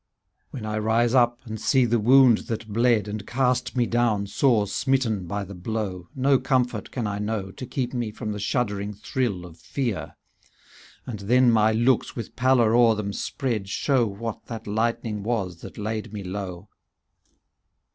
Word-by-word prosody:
When 120 -5 -7
I 110 0 -2
rise 115 +2 +2
up, 120 -2 +3
and 110 -1 -6
see 130 +2 +3
the 120 0 +2
wound 125 +1 +6
that 110 -1 -4
bled. 115 -1 +2
And 105 -1 -5
cast 125 0 0
me 120 - +3
down 115 -4 +1
sore 110 0 +2
smitten 115 -4 0
by 100 +3 -3
the 100 +1 -9
blow. 95 -2 -4
No 135 0 +3
comfort 125 -4 0
can 120 -4 -3
I 100 -1 -2
know. 105 -2 -3
To 130 - -8
keep 125 0 -3
me 120 -3 -2
from 110 0 -5
the 105 - -4
shuddering 100 -2 -1
thrill 105 -4 -2
of 85 -2 -13
fear; 120 -8 -3 0.4
" - - -24
And 110 -5 -6
then 120 +5 +4
my 110 -1 +4
looks, 120 +3 +2
with 115 -4 -6
pallor 125 -3 +3
o'er 120 -2 +5
them 100 -1 -3
spread. 115 -8 -3
Show 130 +2 +1
what 110 +3 -6
that 115 -2 -7
lightning 110 0 -1
was 100 -6 -2
that - - -10
laid 110 +1 -4
me 105 -2 -6
low. 95 0 -6
110 Hz, 175 wpm, -25 LUFS, 105-125 Hz, 0.4 s, wound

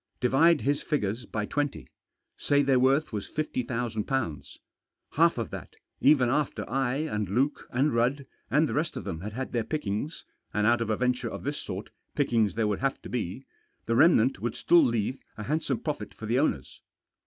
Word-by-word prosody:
Divide 150 +6 +4
his 145 +1 +1
figures 115 -5 -2
by 105 -1 -2
twenty. 145 +4 -2 0.5
Say 145 0 +2
their 135 -2 +3
worth 135 +2 +2
was 105 -2 -4
^50,000. 120 - -2 0.5
Half - - +3
of - - -3
that, - - -8 0.2
even 140 -4 +5
after 145 +4 -1
I, 135 -1 0
and 105 - -2
Luke, 135 +8 0
and 135 +4 +1
Rudd, 125 +4 +1 0.2
and 150 +2 +3
the - - -3
rest 155 +3 -1
of - - -5
them 85 -5 -5
had 105 +2 -6
had 130 +3 -4
their 120 -2 0
pickings 145 +1 -3
— - - -44
and 105 0 +2
out 120 +2 +3
of 115 - -2
a 110 - +1
venture 125 0 0
of - - -7
this 145 +2 -2
sort 95 +1 -6 0.2
pickings 115 - +2
there 115 0 +1
would 105 -2 0
have 135 +1 -1
to - - -8
be 120 +2 -4 0.2
— - - -45
the 115 - 0
remnant 135 - +5
would 120 +4 -3
still 175 -1 +5
leave 115 +2 0 0.2
a 105 - -5
handsome 150 0 -1
profit 125 -10 -4
for 110 - -8
the 120 +4 +1
owners. 75 - -1
125 Hz, 195 wpm, -28 LUFS, 110-145 Hz, 0.5 s, even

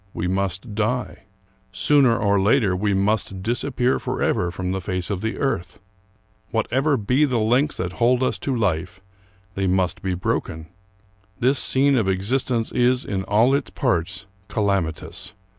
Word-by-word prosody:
We 90 - -2
must 95 +3 -2
die. 110 0 -2 0.5
Sooner 125 +3 +3
or 100 -2 +2
later, 100 -1 +3
we 100 +3 0
must 100 -1 -1
disappear 125 +2 0
forever 90 - -1
from 90 +1 -4
the 95 0 -2
face 90 +2 -3
of 95 -2 -2
the 110 +1 -3
earth. 135 -11 -2 0.7
Whatever 135 +6 +1
be 125 +7 +1
the 130 -5 +1
links 125 +7 +1
that 90 -1 -3
hold 125 +5 +2
us 130 - 0
to 135 - -2
life, 90 -5 -1 0.5
they 95 0 -1
must 95 -1 0
be 95 -2 -2
broken. 80 -2 -3 0.7
This 130 +2 +3
scene 140 +1 +3
of 105 -5 +1
exist 100 +9 0
ence 115 -3 -1
is, 125 +1 +2
in 95 -2 -2
all 110 +7 +3
its 140 - 0
parts, 100 - -1 0.2
calamitous. 100 -3 -2
105 Hz, 155 wpm, -22 LUFS, 95-125 Hz, 0.7 s, Sooner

